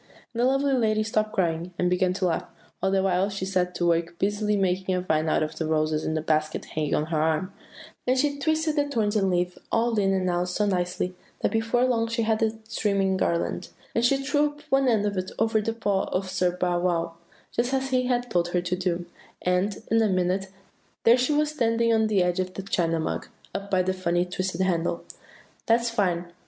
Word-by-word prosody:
"And 235 - -1
the - - +4
lovely 270 +1 +2
lady 215 -4 +2
stopped 215 0 0
crying, 175 -2 -1
and 180 - +1
began 180 0 +2
to 190 0 -1
laugh, 165 -2 0 0.3
all 190 - +2
the 190 0 +2
while 190 +1 +2
she 195 -1 -4
set 180 -2 0
to 175 - 0
work 170 0 +1
busily 210 +2 0
making 185 -1 0
a 180 - 0
vine 155 -3 0
out 155 - +2
of 155 - -4
the 160 - -2
roses 155 0 +1
in 160 - -1
the 155 - -1
basket 155 -1 0
hanging 155 -2 -1
on 150 - 0
her 160 -1 -1
arm; 160 +4 0 0.5
and 255 +1 +3
she 285 +1 +1
twisted 315 +1 +1
the 290 0 +2
thorns 220 -5 0
and 195 -2 +2
leaves 180 0 -1
all 230 -1 +2
in 195 -1 +2
and 190 -1 +1
out 180 0 0
so 210 +4 0
nicely, 180 -1 -1 0.3
that - - +1
before 225 +2 +2
long 230 -3 +1
she 230 0 -1
had 220 0 +1
a 220 0 +1
streaming 200 -4 +1
garland; 170 -2 -1 0.2
and 230 - +1
she 270 +3 +4
threw 290 +2 +1
up 295 0 -9
one 270 0 +4
end 220 -4 +3
of 200 -1 -1
it 185 0 -3
over 225 0 +2
the 225 - -1
paw 205 -4 0
of 185 0 -2
Sir 180 -1 +2
Bow 180 -1 +1
wow, 170 -2 0 0.4
just 245 +2 0
as 270 0 -1
he 255 -1 +2
had 245 -1 0
told 175 -1 +2
her 175 0 0
to 180 0 -1
do, 180 -1 -2 0.4
and, 180 +3 0
in 225 0 +4
a 220 - +3
minute, 185 +1 0 0.6
there 230 - +7
she 255 +3 +1
was 300 0 +2
standing 230 -4 +2
on 220 -1 +3
the 200 -4 +3
edge 180 0 0
of 185 0 -2
the 195 - -5
China 165 -4 0
Mug, 160 - -3 0.3
up 200 0 -5
by 185 -2 +2
the 185 +1 0
funny 175 -1 0
twisted 185 0 -3
handle. 170 -2 0 0.6
"'That's 235 +1 +3
fine! 180 -6 0
190 Hz, 225 wpm, -26 LUFS, 180-225 Hz, 0.6 s, there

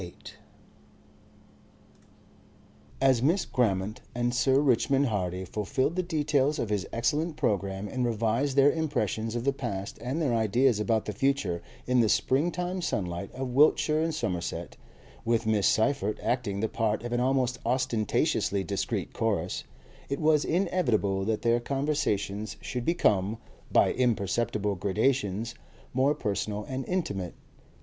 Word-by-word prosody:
Section 90 -1 -9
7 - - -10 2.6
As 130 -3 +4
Miss 165 +9 +2
Grammont 105 -4 0
and 120 0 0
Sir 130 +2 +3
Richmond 135 0 +3
Hardy 95 -5 -2
fulfilled 130 - -1
the 185 - +1
details 150 -4 +1
of 110 - -2
his 100 -3 -1
excellent 150 +8 0
programme 100 -3 -1
and 125 +3 -2
revised 115 +4 0
their 140 +1 +6
impressions 115 - -1
of 120 - -2
the 140 +1 +2
past 100 -8 -5
and 130 +6 -2
their 145 -7 +1
ideas 115 +1 +2
about 110 0 +1
the 105 - -3
future 105 -8 0 0.2
in 125 0 +2
the 115 -2 +4
springtime 175 - +1
sunlight 90 - -3
of 130 0 -3
Wiltshire 150 +2 +4
and 165 -1 -1
Somerset, 90 - -3 0.5
with 115 -1 +1
Miss 110 -3 +2
Seyffert 110 -3 +1
acting 105 -6 -1
the 110 - +1
part 110 -1 -1
of 120 0 -4
an 120 - +1
almost 125 -1 +1
ostentatiously 115 -5 +1
discreet 100 0 -3
chorus, - - -1 0.4
it 140 - -2
was 155 -1 +3
inevitable 120 - +1
that 110 +2 -1
their 120 0 +3
conversation 120 -7 -1
should 125 -1 -4
become, 105 - +2 0.3
by - - +4
imperceptible 110 -3 0
gradations, 105 +2 0 0.4
more 135 +3 +3
personal 105 -3 -2
and 130 +3 -4
intimate. 100 - -2
120 Hz, 140 wpm, -28 LUFS, 105-140 Hz, 2.6 s, their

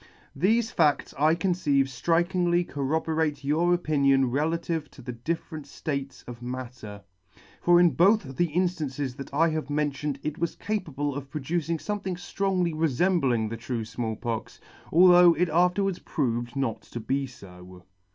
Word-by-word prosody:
Thefe 220 +9 +2
fads 150 -3 +1
I 155 +3 +3
conceive 170 -6 +1
ftrikingly 175 +6 +1
corroborate 150 +1 -1
your 160 +5 +2
opinion 140 -6 +2
relative 160 +2 -1
to - - -14
the 125 - -5
different 155 +4 -5
flates 140 -2 -5
of 120 -1 -9
matter; 120 -5 -7 0.6
for 175 0 +5
in 175 -1 +5
both 175 - +3
the 175 - +2
inftances 150 -6 -2
that 135 - -8
I 165 +4 +3
have 155 -2 -3
mentioned 145 -1 -1
it 150 0 -4
was 170 - -1
capable 150 -9 -3
of 140 0 -7
producing 160 +4 -2
fomething 195 0 -3
flrongly 180 -1 -1
refembling 155 -6 +1
the 115 - -4
true 115 -1 -4
Small 110 0 -4
Pox, 115 0 -5 0.3
although 175 0 +7
it 180 0 +1
afterwards 180 +3 +2
proved 120 -4 -2
not 135 -5 -2
to 120 - -8
be 135 +4 -1
fo. 90 -6 -14
150 Hz, 145 wpm, -26 LUFS, 130-175 Hz, 0.6 s, although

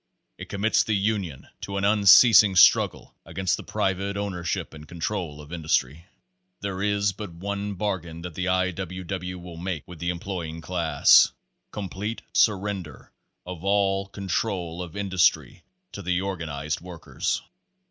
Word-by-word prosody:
It - - -8
commits 105 +2 +2
the 110 - 0
union 100 -8 -2
to 100 0 -4
an 100 - -2
unceasing 105 0 +7
struggle 90 - +4
against 95 -1 -1
the - - -8
private 100 +1 -2
ownership 90 -7 -3
and 75 -1 -11
control 85 -2 -4
of 75 +2 -11
industry. 80 -1 -1 0.5
There 95 -1 -4
is 100 0 +1
but 100 -2 -8
one 100 +3 -4
bargain 90 -4 -3
that 90 -2 -6
the 90 +3 -3
I. 95 0 +2
W. 95 +1 -6
W. 90 0 -5
will 90 -1 -10
make 90 -2 -4
with 90 -3 -11
the 85 +2 -2
employing 85 -2 -4
class 85 -1 +4 0.4
COMPLETE 105 +2 -5
SURRENDER 100 - 0 0.3
OF 90 -1 -8
ALL 100 -1 +1
CONTROL 95 -3 -3
OF 85 -1 -8
INDUSTRY 95 -3 +1 0.3
TO - - -7
THE 90 0 0
ORGAN 95 -4 -4
IZED 75 +1 -3
WORKERS. 85 -2 -4
95 Hz, 145 wpm, -25 LUFS, 85-100 Hz, 0.5 s, unceasing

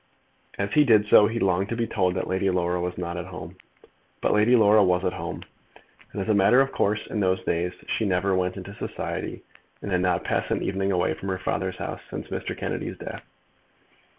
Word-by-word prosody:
As 100 +1 -2
he 150 - +6
did 110 -6 +5
so 105 0 +7
he 115 +2 -3
longed 95 0 +1
to 115 - -2
be 115 0 0
told 95 -4 0
that 95 - -1
Lady 95 +1 0
Laura 90 -1 0
was 90 0 -3
not 85 -1 -4
at 85 +1 -5
home. 95 - -9 0.6
But - - +1
Lady 110 +4 +4
Laura 105 -2 +6
was 90 0 +2
at 90 - 0
home, - - -5 0.7
as 100 0 -3
a 110 - +3
matter 100 +5 +5
of 135 0 +2
course. 105 +1 0
In 110 - -4
those 95 -1 +1
days 85 +1 -1
she 110 - -1
never 95 0 +1
went 90 0 0
into 95 +1 -8
society, - - -5 0.4
and 100 - -4
had 90 -1 +2
not 90 0 +1
passed - - -1
an - - 0
evening 95 0 -1
away 90 -4 +1
from 95 +5 -6
her 95 - -1
father's 95 0 -2
house - - -5
since - - -6
Mr. - - -4
Kennedy's - - -4
death. - - -7
95 Hz, 210 wpm, -25 LUFS, 90-105 Hz, 0.7 s, so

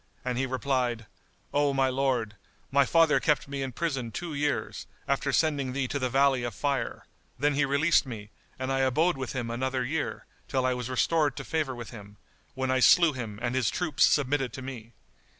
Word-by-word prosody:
and 125 -1 -1
he 135 - 0
replied, 125 -3 -1 0.5
"O 145 -1 +2
my 135 -1 +3
lord, 130 -5 0 0.4
my 140 0 +4
father 165 -2 +4
kept 150 -3 +1
me 140 0 -4
in 135 -1 -3
prison 135 -4 -2
two 165 +8 -5
years, 145 0 -2 0.2
after 140 +1 0
sending 140 -5 +1
thee 135 -1 -1
to 140 - -2
the 130 -1 0
Valley 135 0 +3
of 120 -3 -4
Fire; 140 -3 -2 0.3
then 145 +3 +2
he 140 +1 +2
released 140 +2 +3
me, 105 -4 -8 0.3
and 130 0 -3
I 135 - +1
abode 145 +7 +2
with 130 -2 -5
him 120 -3 -3
another 130 +1 -1
year, 145 +5 -3 0.2
till 130 -2 0
I 130 - +2
was 125 -1 -4
restored 145 +2 +1
to - - -6
favour 155 -5 -2
with 120 -1 -8
him, 105 -3 -12 0.4
when 130 -1 -1
I 130 - +2
slew 165 +4 +6
him 115 -5 -6
and 120 0 0
his 130 -3 +1
troops 160 +1 0
submitted 135 -2 +2
to 130 - -7
me. 120 -3 -8
130 Hz, 200 wpm, -28 LUFS, 125-145 Hz, 0.5 s, slew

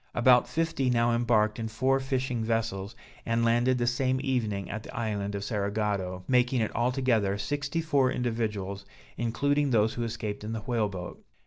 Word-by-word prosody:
About 125 0 +5
fifty 160 -5 0
now 120 -1 +3
embarked 110 -2 +2
in 115 - -2
four 130 +4 +1
fishing 130 -3 -1
vessels, 110 -2 -2 0.3
and 115 0 +1
landed 120 +2 +3
the 120 - 0
same 130 +1 +1
evening 110 -8 -1
at 110 +2 -5
the - - -11
island 105 -3 -2
of 100 - -3
Cerigotto, 100 -3 -2
making 125 -2 +2
altogether 120 -5 +1
sixty 145 +9 -2
four 140 -5 +2
individuals, 105 -5 -2 0.3
including 140 +5 +1
those 110 -2 +3
who 120 - -3
escaped 110 -3 -4
in 110 +1 -4
the 110 - -3
whale 115 -2 0
boat. 90 -2 -8
115 Hz, 160 wpm, -28 LUFS, 105-125 Hz, 0.3 s, About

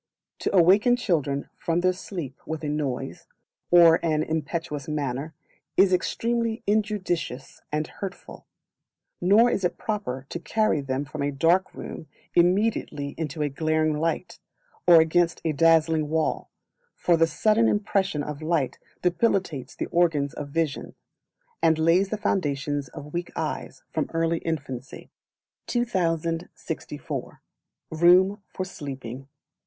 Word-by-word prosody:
To - - -1
awaken 200 +8 +6
Children 150 - -1
from 170 +1 0
their 185 0 +3
sleep 170 -7 -7
with 160 0 -4
a 150 - -2
noise, 145 -4 -3 0.4
or 170 -2 +7
in 165 - -1
an 155 0 +1
impetuous 155 -1 -3
manner, 145 0 -3 0.4
is 190 0 +5
extremely 230 +4 0
injudicious 200 - -1
and 155 +1 0
hurtful; 195 +3 -9 0.7
nor 210 +7 +5
is 195 - -1
it 180 - 0
proper 170 - -3
to 170 - -4
carry 215 -3 +1
them 135 +1 -2
from 145 +2 -6
a 140 - +1
dark 170 +6 +2
room 155 - -8 0.3
immediately 175 -5 +2
into 155 -1 -3
a 145 - 0
glaring 155 +2 +1
light, 165 +3 -2 0.5
or 170 -2 +9
against 170 +2 +2
a 160 - +2
dazzling 160 0 +3
wall; 160 0 -1 0.5
for 175 - +2
the 165 0 +4
sudden 215 +8 +3
impression 195 -6 0
of 150 0 -6
light 155 -4 0 0.2
debilitates 175 - 0
the - - -3
organs 160 -5 +2
of 145 -1 -6
vision, 155 -1 -2 0.7
and 160 -1 +4
lays 170 +5 +3
the 215 - -2
foundation 145 -7 -1
of 145 -1 -9
weak 175 0 -3
eyes, - - -4
from - - -1
early 165 0 +1
infancy. 135 -6 -5 0.6
2064. 170 -8 -3 0.5
Room 180 +5 +5
for 185 - -5
Sleeping. 135 -7 -7
165 Hz, 130 wpm, -25 LUFS, 150-185 Hz, 0.7 s, or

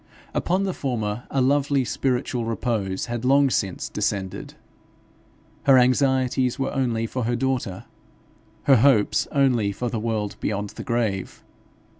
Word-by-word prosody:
Upon 185 +3 0
the 190 -2 -1
former 120 -6 -3
a 135 - 0
lovely 140 0 +2
spiritual 125 -1 -1
repose 110 -4 -2
had 120 -1 -4
long 135 +1 +4
since 95 -6 -1
descended. 100 -3 -3 1.1
Her 135 -2 +7
anxieties 130 0 +2
were 135 - -2
only 120 -4 0
for 125 +1 -3
her 120 +1 0
daughter, 125 -8 -2 0.8
her 135 -2 +6
hopes 115 -3 +3
only 125 -8 +2
for 120 +4 -3
the 115 - -2
world 110 -2 -2
beyond 105 0 -2
the - - -8
grave. 110 -5 -2
120 Hz, 135 wpm, -24 LUFS, 110-135 Hz, 1.1 s, Her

